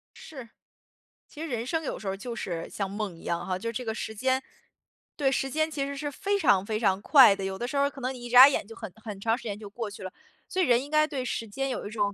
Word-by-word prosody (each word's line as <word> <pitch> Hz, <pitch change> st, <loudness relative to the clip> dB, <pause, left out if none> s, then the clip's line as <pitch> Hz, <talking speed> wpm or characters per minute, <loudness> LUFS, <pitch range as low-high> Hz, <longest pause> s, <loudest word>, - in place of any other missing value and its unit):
是， 260 Hz, -7 st, -10 dB, 0.8 s
其 300 Hz, -, -11 dB
实 325 Hz, -, -3 dB
人 240 Hz, -5 st, -3 dB
生 320 Hz, +4 st, -1 dB
有 -, -, -3 dB
时 205 Hz, -, -8 dB
候 190 Hz, -, 0 dB
儿 -, -, -6 dB
就 240 Hz, +3 st, -6 dB
是 170 Hz, -6 st, -4 dB
像 200 Hz, -2 st, -3 dB
梦 200 Hz, -2 st, -4 dB
一 -, -, -15 dB
样 170 Hz, 0 st, -2 dB
哈， 185 Hz, -1 st, -1 dB
就 230 Hz, +5 st, -4 dB
这 245 Hz, +2 st, -5 dB
个 220 Hz, -, -2 dB
时 220 Hz, -, -5 dB
间 260 Hz, +4 st, +1 dB, 0.7 s
对， 275 Hz, -3 st, +1 dB
时 270 Hz, +1 st, 0 dB
间 315 Hz, +3 st, 0 dB
其 285 Hz, -3 st, -2 dB
实 280 Hz, 0 st, -5 dB
是 290 Hz, +1 st, -3 dB
非 400 Hz, +8 st, -1 dB
常 200 Hz, -, +3 dB
非 215 Hz, 0 st, -2 dB
常 195 Hz, -3 st, +1 dB
快 260 Hz, -5 st, +7 dB
的， 195 Hz, -, -6 dB
有 190 Hz, 0 st, -3 dB
的 240 Hz, -, -3 dB
时 280 Hz, -, -3 dB
候 280 Hz, -, +4 dB
儿 280 Hz, -, +2 dB
可 275 Hz, -1 st, -12 dB
能 255 Hz, +1 st, -2 dB
你 250 Hz, -2 st, -10 dB
一 -, -, -6 dB
眨 250 Hz, +2 st, +10 dB
眼 265 Hz, -, -1 dB
就 225 Hz, -, -11 dB
很 195 Hz, -, -8 dB
很 210 Hz, -3 st, -7 dB
长 225 Hz, +3 st, +1 dB
时 -, -, -12 dB
间 205 Hz, -3 st, -4 dB
就 210 Hz, -2 st, -9 dB
过 220 Hz, +1 st, -5 dB
去 205 Hz, -1 st, -10 dB
了。 185 Hz, -, -6 dB, 0.4 s
所 375 Hz, -, -1 dB
以 -, -, +4 dB
人 245 Hz, 0 st, +3 dB
应 285 Hz, -, -10 dB
该 305 Hz, 0 st, +4 dB
对 275 Hz, -5 st, -3 dB
时 230 Hz, -2 st, -3 dB
间 270 Hz, +6 st, -3 dB
有 255 Hz, -, -4 dB
一 -, -, -7 dB
种 205 Hz, -2 st, 0 dB
240 Hz, 320 characters per minute, -27 LUFS, 205-275 Hz, 0.8 s, 眨